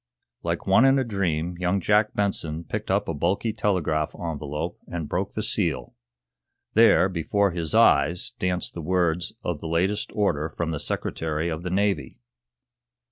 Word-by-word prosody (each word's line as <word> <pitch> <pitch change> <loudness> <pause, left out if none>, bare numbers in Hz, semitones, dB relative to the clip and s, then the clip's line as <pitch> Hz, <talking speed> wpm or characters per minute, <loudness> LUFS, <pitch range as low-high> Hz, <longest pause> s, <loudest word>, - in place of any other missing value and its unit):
Like 85 0 -2
one 95 +5 +5
in 135 0 +5
a 135 - +2
dream 90 -6 -2
young 90 +2 +1
Jack 105 +3 +2
Benson 85 -6 -1
picked - - -5
up - - +1
a 85 - -1
bulky 95 +8 0
telegraph 85 -8 0
envelope 80 0 -4
and 85 -4 -4
broke 95 +5 -2
the 110 - -2
seal. 85 - -1 0.8
There, 110 -4 +6
before 95 +3 +1
his 85 -3 -1
eyes, 75 +6 +4
danced 90 -1 -1
the 85 - -6
words 85 0 0
of 85 -4 -2
the 80 - -6
latest 90 +6 0
order 80 -7 +1
from 85 -1 -3
the 75 - -3
Secretary 80 +2 -2
of 80 -1 -3
the 90 - -4
Navy. 95 -7 0
85 Hz, 160 wpm, -25 LUFS, 80-100 Hz, 0.8 s, There